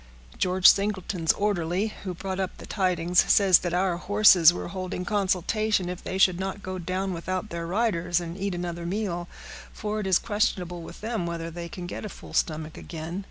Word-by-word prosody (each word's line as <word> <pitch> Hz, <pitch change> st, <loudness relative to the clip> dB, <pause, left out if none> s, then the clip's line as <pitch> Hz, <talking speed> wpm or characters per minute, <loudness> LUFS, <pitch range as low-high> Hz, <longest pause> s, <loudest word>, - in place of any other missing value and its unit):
George 185 Hz, 0 st, 0 dB
Singleton's 195 Hz, -4 st, +4 dB
orderly, 200 Hz, 0 st, -1 dB
who 185 Hz, -2 st, -4 dB
brought 190 Hz, +1 st, -4 dB
up 190 Hz, -1 st, -3 dB
the -, -, -10 dB
tidings, 180 Hz, -3 st, +1 dB
says 195 Hz, -3 st, +6 dB
that 175 Hz, -, -3 dB
our 180 Hz, 0 st, +1 dB
horses 185 Hz, -3 st, +6 dB
were 175 Hz, -, -5 dB
holding 185 Hz, -1 st, -4 dB
consultation 200 Hz, 0 st, 0 dB
if 180 Hz, 0 st, -6 dB
they 190 Hz, -, -3 dB
should 185 Hz, -2 st, +4 dB
not 195 Hz, +1 st, -4 dB
go 185 Hz, 0 st, -5 dB
down 185 Hz, +2 st, -2 dB
without 185 Hz, +4 st, -4 dB
their 170 Hz, 0 st, -4 dB
riders, 180 Hz, -4 st, +1 dB
and 170 Hz, -1 st, -6 dB
eat 195 Hz, -1 st, -3 dB
another 175 Hz, -1 st, -4 dB
meal, 180 Hz, -3 st, -2 dB, 0.4 s
for 210 Hz, 0 st, -4 dB
it 205 Hz, -, -3 dB
is 185 Hz, -2 st, +5 dB
questionable 180 Hz, -5 st, -1 dB
with 165 Hz, -, -11 dB
them 220 Hz, -5 st, -2 dB
whether 165 Hz, -1 st, -4 dB
they 170 Hz, 0 st, -7 dB
can 180 Hz, +1 st, -7 dB
get 175 Hz, -, -6 dB
a 215 Hz, -, -5 dB
full -, -, -12 dB
stomach 155 Hz, -1 st, -1 dB
again. 165 Hz, +2 st, -6 dB
185 Hz, 190 wpm, -26 LUFS, 175-195 Hz, 0.4 s, says